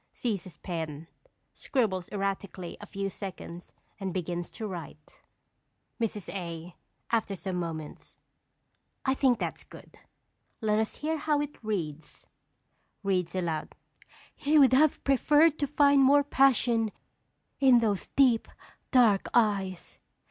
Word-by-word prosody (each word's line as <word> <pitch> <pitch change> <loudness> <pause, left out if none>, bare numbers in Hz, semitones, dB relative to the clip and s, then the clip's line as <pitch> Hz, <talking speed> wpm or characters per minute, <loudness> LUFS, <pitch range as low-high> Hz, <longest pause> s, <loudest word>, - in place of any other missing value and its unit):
Seizes 195 -7 -4
pen, 160 -3 -5 0.5
scribbles 200 -9 -1
erratically 195 -3 -3
a 205 - -9
few 195 0 -3
seconds 185 -3 -8 0.3
and 195 -2 -3
begins 175 -1 -3
to 220 - -7
write._] 170 -6 -9 0.8
Mrs. 210 -4 -2
A. 170 -2 -6 0.4
(after 220 -4 0
some 185 0 -4
moments). 160 -3 -6 0.9
I 265 - +3
think 260 -3 +3
that - - -3
is - - -12
good. - - -15 0.6
Let 215 -2 +1
us 220 - -1
hear 320 +2 -2
how 300 -1 +1
it 295 -4 -5
reads. 160 -8 -4 0.8
(Reads 190 -3 0
aloud.) 165 -4 -3 0.6
"He 300 +2 +2
would 270 -3 +6
have 300 +3 +4
preferred 295 +3 +4
to 285 - 0
find 285 -1 +4
more 285 +2 +6
passion 240 -5 +3 0.7
in 260 -3 +6
those 215 -5 0
deep, 250 -5 +4 0.4
dark 230 -7 +4
eyes. 200 -6 0
205 Hz, 125 wpm, -29 LUFS, 180-265 Hz, 0.9 s, would